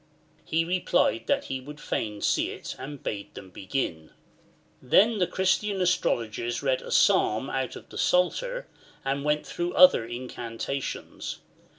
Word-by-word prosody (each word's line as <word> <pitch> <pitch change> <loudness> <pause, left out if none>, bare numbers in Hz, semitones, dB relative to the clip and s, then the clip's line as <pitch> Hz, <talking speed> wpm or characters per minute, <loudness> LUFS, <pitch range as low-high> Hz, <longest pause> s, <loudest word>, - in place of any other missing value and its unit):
He 165 +1 0
replied 175 -10 +1
that - - +2
he 130 -1 -4
would 150 +3 -10
fain 105 -6 -3
see - - +2
it, - - -7
and 140 +1 -8
bade 100 -1 -5
them 95 - -10
begin. 90 -6 -3 0.7
Then 205 - +4
the 180 - +3
Christian 190 +2 +1
astrologers 120 -10 0
read 130 -2 +1
a - - -9
Psalm 110 +6 +3
out 130 -1 -2
of - - -11
the - - -7
Psalter, - - +1 0.4
and 140 +1 -1
went 150 0 +1
through 175 +1 -3
other 185 -9 +7
incantations. 120 +2 -5
135 Hz, 145 wpm, -27 LUFS, 120-180 Hz, 0.7 s, other